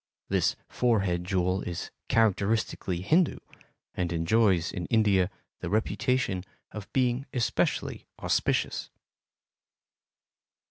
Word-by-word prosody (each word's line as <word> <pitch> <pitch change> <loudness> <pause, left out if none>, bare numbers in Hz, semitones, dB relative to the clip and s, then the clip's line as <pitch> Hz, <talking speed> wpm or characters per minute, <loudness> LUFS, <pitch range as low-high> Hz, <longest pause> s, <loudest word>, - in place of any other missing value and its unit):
This - - +2
forehead 100 -8 +1
jewel 90 0 +1
is 85 -1 -5 0.2
characteristically 105 -4 +1
Hindu 160 - +3 0.6
and 90 -1 -2
enjoys 85 +1 +2
in 90 -3 -4
India 100 -5 +3 0.3
the 85 - -4
reputation 110 -1 0 0.3
of 105 -2 -8
being 130 +1 +1
especially 120 -3 0
auspicious. - - 0
100 Hz, 90 wpm, -28 LUFS, 90-115 Hz, 0.6 s, Hindu